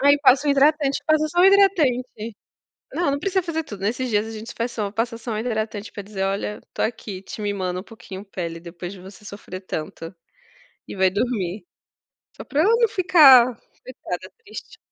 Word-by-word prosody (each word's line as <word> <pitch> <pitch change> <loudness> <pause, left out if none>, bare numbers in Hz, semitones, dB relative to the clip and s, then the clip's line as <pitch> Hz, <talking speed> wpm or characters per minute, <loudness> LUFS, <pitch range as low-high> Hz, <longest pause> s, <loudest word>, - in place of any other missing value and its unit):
Aí 285 +1 +6
passa 275 +1 +5
o - - +4
hidratante, 280 0 +3
passa 310 0 +3
só 350 +3 +1
o - - +7
hidratante. 275 - +3 0.6
Não, 340 -4 0
não 280 - -1
precisa 380 +4 0
fazer 325 -2 -3
tudo. 205 -9 -9
Nesses 245 +5 -1
dias, 210 0 +1
a - - -7
gente 225 +1 -8
faz 235 +1 -3
só 210 -3 -3
passa 230 +3 -2
só 230 0 -6
o 215 - -2
hidratante 220 -2 -3
para 205 - -7
dizer: 195 -1 -4
"Olha, 195 +2 -2
estou - - -4
aqui 205 -4 -5
te 205 - -9
mimando 190 -3 -2
um - - -9
pouquinho, 200 -3 -10
pele, 170 -4 -6
depois 175 +2 -8
de 190 - -11
você 190 +3 -13
sofrer 200 -2 -8
tanto". 165 -1 -6 0.7
E - - -8
vai 190 -1 +3
dormir. 200 -2 -2 0.7
Só - - -8
para 295 +2 +1
ela 435 +5 +4
não 465 -1 +3
ficar, 270 - +6 0.2
estressada, 185 -7 -8
triste. 405 - -10
225 Hz, 195 wpm, -23 LUFS, 195-285 Hz, 0.7 s, o